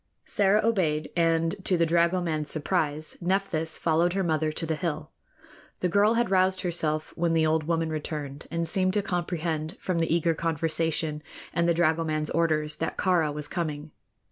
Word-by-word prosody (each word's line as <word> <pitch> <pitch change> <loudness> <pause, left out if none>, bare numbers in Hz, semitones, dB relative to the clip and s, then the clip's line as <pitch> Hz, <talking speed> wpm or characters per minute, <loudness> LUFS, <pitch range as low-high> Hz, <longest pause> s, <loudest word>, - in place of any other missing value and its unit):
Sĕra 205 +1 +3
obeyed, 170 -9 0
and, 165 +1 +2
to 185 - +3
the 165 - +3
dragoman's 170 -2 +1
surprise, 155 -1 -1
Nephthys 175 -3 -1
followed 170 +2 +2
her 195 0 0
mother 155 -2 0
to 165 - -2
the 160 - -1
hill. 160 -1 -3 0.7
The 180 - +1
girl 205 +5 +3
had 235 -3 +1
roused 185 0 +3
herself 155 -4 -2
when 170 -1 0
the 160 -1 +3
old 155 0 +1
woman 165 -1 0
returned, 150 -2 -5
and 170 0 -2
seemed 185 +2 +1
to 205 -1 +1
comprehend, 170 -3 -3
from 180 -3 -1
the 165 - 0
eager 165 0 +2
conversation 160 -1 -1 0.3
and 170 0 +1
the 170 - +3
dragoman's 160 -2 +1
orders, 155 -2 +1
that 165 - -3
Kāra 175 -6 +2
was 150 0 -4
coming. 155 -3 -4
165 Hz, 170 wpm, -27 LUFS, 155-175 Hz, 0.7 s, Sĕra